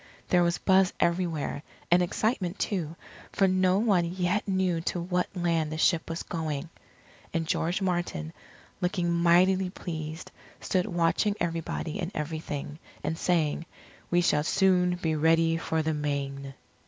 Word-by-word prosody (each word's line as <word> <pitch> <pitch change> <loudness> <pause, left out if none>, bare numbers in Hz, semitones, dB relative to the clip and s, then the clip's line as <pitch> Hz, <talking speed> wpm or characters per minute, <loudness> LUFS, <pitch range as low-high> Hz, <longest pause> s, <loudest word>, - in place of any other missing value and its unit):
There 180 - +4
was 170 0 +2
buzz 190 -1 +3
everywhere, 170 -4 0 0.3
and 175 +1 +6
excitement 190 0 -1
too, 170 -6 -2 0.4
for 195 - +3
no 185 0 +3
one 200 -5 +3
yet 180 +4 -1
knew 185 -3 +1
to 175 - -2
what 180 +1 0
land 165 -3 0
the 155 - -3
ship 160 +1 +2
was 165 +1 -3
going. 155 -2 -3 0.7
And 165 -1 0
George 175 +4 0
Martin, 175 - -2 0.5
looking 180 -1 0
mightily 180 +2 +4
pleased, 160 -3 -6 0.3
stood 185 +1 0
watching 175 +3 +1
everybody 165 0 -3
and 175 -2 -2
everything, 150 -1 -4 0.2
and 160 - -1
saying, 165 -2 0 0.4
"We 175 0 +3
shall 150 -4 +3
soon 180 0 +3
be 165 -3 -1
ready 165 +1 +3
for 160 -1 -1
the 160 0 0
Main." 140 -2 -3
170 Hz, 140 wpm, -28 LUFS, 160-180 Hz, 0.7 s, and